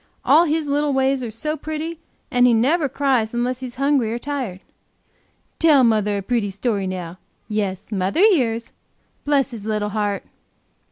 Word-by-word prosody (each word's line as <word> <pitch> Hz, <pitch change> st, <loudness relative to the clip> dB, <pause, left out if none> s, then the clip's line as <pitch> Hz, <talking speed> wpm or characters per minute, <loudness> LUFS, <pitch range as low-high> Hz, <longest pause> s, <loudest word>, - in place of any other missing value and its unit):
All 335 Hz, +2 st, +6 dB
his 315 Hz, 0 st, 0 dB
little 290 Hz, 0 st, 0 dB
ways 265 Hz, 0 st, +1 dB
are 240 Hz, -, -4 dB
so 300 Hz, +8 st, -3 dB
pretty, 315 Hz, +1 st, -5 dB, 0.3 s
and 245 Hz, 0 st, +4 dB
he 240 Hz, -, +4 dB
never 285 Hz, +6 st, +2 dB
cries 255 Hz, -5 st, 0 dB
unless 245 Hz, +1 st, -1 dB
he's 255 Hz, -2 st, -7 dB
hungry 275 Hz, -4 st, +1 dB
or 235 Hz, -, -2 dB
tired. 250 Hz, -9 st, -4 dB, 1.0 s
Tell 300 Hz, -5 st, +5 dB
mother 210 Hz, -3 st, +2 dB
a -, -, -2 dB
pretty 225 Hz, -1 st, 0 dB
story 200 Hz, 0 st, -2 dB
now; 180 Hz, -1 st, -6 dB, 0.3 s
yes, 205 Hz, -2 st, -3 dB
mother 195 Hz, -, 0 dB
hears, 245 Hz, -, +2 dB, 0.5 s
bless 280 Hz, -2 st, +2 dB
his 225 Hz, -4 st, -8 dB
little 210 Hz, -1 st, -1 dB
heart!" 205 Hz, -1 st, -2 dB
245 Hz, 160 wpm, -21 LUFS, 210-285 Hz, 1.0 s, All